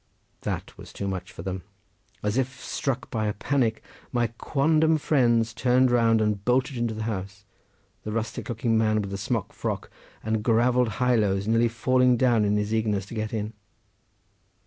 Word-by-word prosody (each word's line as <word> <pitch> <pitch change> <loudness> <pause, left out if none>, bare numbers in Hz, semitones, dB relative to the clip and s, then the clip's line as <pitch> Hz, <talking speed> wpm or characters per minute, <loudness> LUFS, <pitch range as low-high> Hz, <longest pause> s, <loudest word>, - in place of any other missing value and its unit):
That - - -4
was - - -11
too 100 - -4
much 95 -2 -4
for 85 - -9
them. 95 0 -4 0.6
As 105 +1 0
if 130 0 -1
struck 135 -4 -3
by 110 -2 -1
a 105 - 0
panic, 120 0 0 0.3
my 120 -2 0
quondam 155 +2 +3
friends 120 -6 +2
turned 125 +1 +3
round 115 -2 +4
and 105 -2 0
bolted 130 +3 +1
into 120 -2 -1
the 110 - -4
house; 100 -2 -5 0.6
the 105 - -5
rustic 115 +4 -3
looking 115 -1 +1
man 110 -1 +2
with 100 - -6
the 100 - -3
smock 110 0 -2
frock - - -4 0.3
and 110 0 0
gravelled 120 0 +3
highlows 105 -6 +2
nearly 115 +1 +3
falling 125 +2 +3
down 115 -4 +3
in 105 0 +2
his 105 +1 -1
eagerness 105 -3 0
to 100 - -11
get 110 -1 -3
in. 110 -1 -3
115 Hz, 170 wpm, -26 LUFS, 105-125 Hz, 0.6 s, round